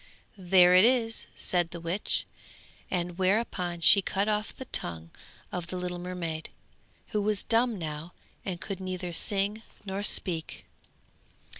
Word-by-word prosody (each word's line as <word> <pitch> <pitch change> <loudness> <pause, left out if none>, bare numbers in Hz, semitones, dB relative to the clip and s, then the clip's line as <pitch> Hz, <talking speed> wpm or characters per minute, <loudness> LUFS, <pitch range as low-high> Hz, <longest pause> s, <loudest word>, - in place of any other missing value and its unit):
'There 180 -2 +5
it 185 +1 +8
is,' 230 -2 +2
said 175 -2 +1
the 170 - -8
witch, 170 +5 -2 0.6
and 175 -1 -2
thereupon 185 -3 0
she 200 +4 +8
cut 195 +2 -1
off 210 0 -1
the 260 - -8
tongue 85 - -1 0.4
of 175 -2 -4
the 185 - -4
little 180 0 -4
mermaid, 175 -3 -5 0.6
who 210 - -1
was 210 0 +1
dumb 230 0 +2
now 155 0 -6 0.3
and 180 -3 -4
could 195 -3 -5
neither 185 -2 -5
sing 205 +4 0 0.2
nor 195 0 -3
speak. 175 -5 +1
185 Hz, 140 wpm, -28 LUFS, 175-205 Hz, 0.6 s, it